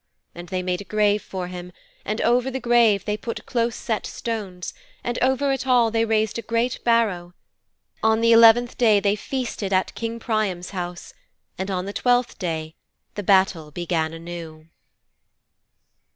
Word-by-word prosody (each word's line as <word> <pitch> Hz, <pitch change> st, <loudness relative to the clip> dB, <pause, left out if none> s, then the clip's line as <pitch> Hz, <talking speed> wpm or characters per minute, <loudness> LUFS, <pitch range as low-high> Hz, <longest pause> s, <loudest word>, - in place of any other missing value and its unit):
And 175 Hz, 0 st, -10 dB
they 185 Hz, -1 st, -2 dB
made 180 Hz, 0 st, -2 dB
a -, -, -7 dB
grave 210 Hz, 0 st, +1 dB
for 185 Hz, -1 st, -5 dB
him, 180 Hz, 0 st, -8 dB, 0.3 s
and 215 Hz, +3 st, -3 dB
over 245 Hz, +2 st, +2 dB
the 265 Hz, 0 st, -3 dB
grave 235 Hz, -4 st, +3 dB
they 210 Hz, -, 0 dB
put 230 Hz, +2 st, -6 dB
close 235 Hz, -1 st, 0 dB
set 220 Hz, -3 st, -3 dB
stones, 200 Hz, -6 st, -5 dB, 0.3 s
and 240 Hz, 0 st, -2 dB
over 265 Hz, +2 st, +2 dB
it 265 Hz, 0 st, -2 dB
all 240 Hz, -3 st, +4 dB
they 225 Hz, 0 st, +2 dB
raised 220 Hz, 0 st, 0 dB
a -, -, -3 dB
great 230 Hz, +2 st, -1 dB
barrow. 200 Hz, -7 st, +1 dB, 0.7 s
On 220 Hz, 0 st, +3 dB
the 230 Hz, 0 st, +4 dB
eleventh 230 Hz, +1 st, +6 dB
day 220 Hz, -4 st, +5 dB
they 200 Hz, 0 st, +1 dB
feasted 230 Hz, -4 st, -4 dB
at 185 Hz, -1 st, +1 dB
King 230 Hz, 0 st, -4 dB
Priam's 210 Hz, -6 st, -2 dB
house, 175 Hz, -2 st, -6 dB, 0.4 s
and 190 Hz, +1 st, -4 dB
on 185 Hz, -1 st, -2 dB
the 200 Hz, -, -5 dB
twelfth 245 Hz, +1 st, +1 dB
day 160 Hz, -3 st, -3 dB, 0.4 s
the 205 Hz, -, -4 dB
battle 190 Hz, -5 st, +2 dB
began 160 Hz, 0 st, -2 dB
anew.' 165 Hz, -1 st, -9 dB
210 Hz, 165 wpm, -23 LUFS, 180-230 Hz, 0.7 s, eleventh